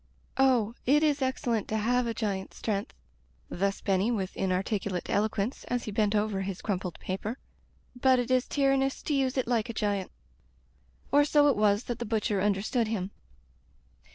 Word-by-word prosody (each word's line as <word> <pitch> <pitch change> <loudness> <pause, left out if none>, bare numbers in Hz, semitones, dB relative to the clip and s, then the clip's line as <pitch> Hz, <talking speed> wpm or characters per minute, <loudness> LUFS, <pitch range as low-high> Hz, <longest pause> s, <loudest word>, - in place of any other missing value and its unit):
"Oh! 245 -5 +3
it 295 +4 +5
is 295 -2 +2
excellent 245 -4 -1
to 220 - -1
have 245 +3 +1
a 230 - -1
giant's 195 -4 -3
strength" 205 -2 -3 0.3
— - - -34
^thus 195 +2 -1
Benny 195 +1 +2
with 195 -6 -2
inarticulate 190 0 -1
elo 215 +2 +2
quence, 215 +4 -3
as 245 -1 -1
he 215 - -5
bent 210 0 +1
over 210 -2 0
his 190 -1 -5
crumpled 185 -4 -2
paper 205 +6 -4 0.3
— - - -37
"but 260 -1 +5
it 245 0 -1
is 255 0 +2
tyrannous 270 -1 +1
to 300 - -1
use 270 -1 +1
it 260 - 0
like 235 -3 0
a - - -3
giant." 205 -3 -1 1.0
Or 290 +1 +6
so 290 0 +4
it 275 - +3
was 210 +1 +3
that 240 -1 -4
the 240 - -3
butcher 210 -3 0
understood 210 +4 +1
him. 200 -3 -3
220 Hz, 180 wpm, -29 LUFS, 200-255 Hz, 1.0 s, Or